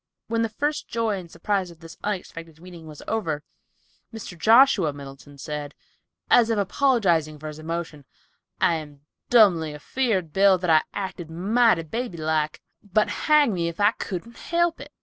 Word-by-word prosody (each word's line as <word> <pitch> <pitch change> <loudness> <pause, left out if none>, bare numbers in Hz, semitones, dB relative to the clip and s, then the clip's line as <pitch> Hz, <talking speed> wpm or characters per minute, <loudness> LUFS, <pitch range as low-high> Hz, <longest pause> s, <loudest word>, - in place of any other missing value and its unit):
When 230 0 0
the 225 - 0
first 295 +7 -2
joy 225 -4 -1
and 175 -2 -11
surprise 185 +2 -2
of 170 -2 -15
this 165 0 -12
unexpected 165 -5 -5
meeting 170 -2 -12
was 150 -2 -11
over, 160 -10 -2 0.7
Mr. 220 -5 -8
Joshua 220 - +5
Middleton 140 0 -12
said, 150 0 -6 0.5
as 235 -2 +5
if 225 - +1
apologizing 195 - +1
for 155 +1 -7
his 150 0 -10
emotion, 160 -2 -5 0.5
"I'm 150 -4 -1 0.3
dumbly 175 -10 +4
afeard, 190 - -2
Bill, 195 -1 +5
that 180 -2 0
I 155 -1 +6
acted 190 -4 -5
mighty 200 +2 +2
baby 225 +3 -5
like, 155 -1 -1 0.2
but 210 +1 +1 0.2
hang 300 -7 +5
me 170 -2 -1
if 170 +2 -6
I 205 +1 +5
could 225 +2 -6
help 340 +3 -1
it. - - -11
180 Hz, 160 wpm, -24 LUFS, 160-225 Hz, 0.7 s, I